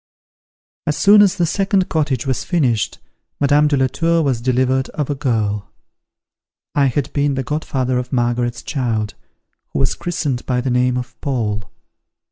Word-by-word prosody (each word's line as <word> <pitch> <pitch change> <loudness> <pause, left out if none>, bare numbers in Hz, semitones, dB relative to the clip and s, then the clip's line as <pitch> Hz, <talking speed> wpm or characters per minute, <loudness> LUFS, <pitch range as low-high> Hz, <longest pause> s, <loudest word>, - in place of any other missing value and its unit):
As 150 -1 0
soon 200 +8 +7
as 200 -1 +4
the 175 -3 +1
second 195 +2 +1
cottage 145 -6 0
was 130 -2 -1
finished, 130 - 0 0.4
Madame 145 +1 +4
de 145 -1 +2
la 130 - +3
Tour 165 +5 +1
was 130 -5 0
delivered 130 +1 +1
of 150 -1 -1
a - - +1
girl. 110 -6 -1 1.0
I 140 -1 +3
had 135 +2 -2
been 145 -1 +1
the 135 - -1
godfather 130 -3 -1
of 125 0 -6
Margaret's 120 -1 0
child, 115 -7 -2 0.6
who - - -2
was 135 - +2
christened 150 -8 -2
by 125 -1 +1
the 125 +1 -1
name 125 0 +2
of 125 0 -7
Paul. 105 -7 -2
130 Hz, 160 wpm, -19 LUFS, 125-150 Hz, 1.0 s, soon